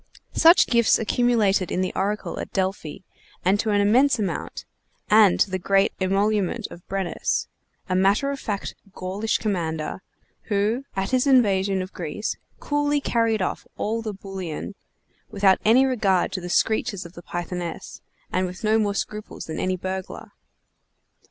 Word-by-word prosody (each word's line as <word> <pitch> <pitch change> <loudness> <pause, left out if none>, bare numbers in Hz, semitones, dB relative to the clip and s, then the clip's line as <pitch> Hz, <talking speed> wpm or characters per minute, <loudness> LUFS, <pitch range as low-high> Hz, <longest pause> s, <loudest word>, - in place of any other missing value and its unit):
Such 335 +2 +6
gifts 235 -2 +4
accumulated 215 -5 +1
in 185 - 0
the 185 - -2
oracle 205 +2 -2
at - - -6
Delphi 190 -4 -3 0.4
and 195 +3 +3
to 220 - 0
an 205 -1 +3
immense 245 +6 +4
amount, 200 -5 -4 0.5
and 210 -3 +6
to 195 - +2
the 185 - -1
great 195 +2 +2
emolument 200 +3 +1
of 175 - -10
Brennus, 195 -2 -1 0.4
a 185 - -1
matter 200 +9 +2
of 280 - -5
fact 205 -5 -4 0.2
Gaulish 195 +4 -1
commander, 165 -6 -3 0.5
who, 215 +6 0
at 195 +3 -2
his 255 +1 +2
invasion 200 -7 +3
of 185 - -10
Greece, 175 +5 -4 0.2
coolly 290 0 0
carried 230 -6 +1
off - - -4
all 225 +2 -1
the 220 -1 -4
bullion, 195 -3 -6 0.6
without 195 -2 +3
any 245 +5 +5
regard 210 -8 +1
to 185 - -4
the 175 - -6
screeches 215 0 0
of 170 - -11
the 175 - -10
Pythoness, 175 0 -6 0.3
and 185 0 0
with 180 +5 -9
no 220 +1 +3
more 205 -2 0
scruples 210 +1 -5
than 160 - -5
any 185 0 -1
burglar. 185 +1 -6
200 Hz, 155 wpm, -24 LUFS, 185-220 Hz, 0.6 s, Such